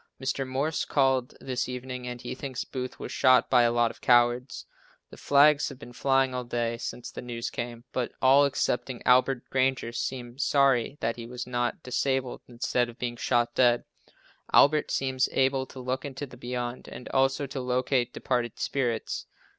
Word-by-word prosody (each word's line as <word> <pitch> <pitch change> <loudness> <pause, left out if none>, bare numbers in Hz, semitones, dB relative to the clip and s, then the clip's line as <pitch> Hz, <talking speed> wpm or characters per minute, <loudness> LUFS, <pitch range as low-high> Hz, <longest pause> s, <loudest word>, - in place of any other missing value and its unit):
Mr. 130 0 -2
Morse 140 +5 -1
called 130 -3 +1
this 130 -1 -3
evening 125 0 -6
and 125 -1 -6
he 120 - -5
thinks 135 -3 -5
Booth 130 -1 -6
was - - -6
shot 130 -1 +4
by 125 -2 +6
a 120 -1 +3
lot 120 -1 +2
of - - -18
cowards. 120 +1 +2 0.5
The - - -12
flags 145 +1 +4
have 135 - -10
been 120 - -12
flying 135 +1 +2
all 125 0 -2
day, 120 -1 -2
since 120 +1 -6
the - - -7
news 120 -2 -5
came, 120 0 -5
but 125 -2 -2
all, 135 +2 +6
excepting 130 -2 -1
Albert 130 0 +3
Granger, 130 -2 +1
seem 120 +1 -5
sorry 140 -2 +2
that 115 +1 -1
he 115 -1 -7
was 125 0 -6
not 120 -1 -2
disabled 130 0 -1
instead 120 0 -1
of 120 - -12
being 120 -1 -3
shot 120 0 +1
dead. 120 -1 +3 0.7
Albert 150 +1 +5
seems 130 -1 0
able 130 0 +1
to 130 - -11
look 130 +1 -3
into 140 0 -5
the 130 - -13
"beyond" 120 0 -5
and 125 - -9
also 135 +1 +2
to 135 -1 -5
locate 125 0 0
departed 120 -3 -2
spirits. 125 -5 -2
125 Hz, 180 wpm, -27 LUFS, 120-135 Hz, 0.7 s, by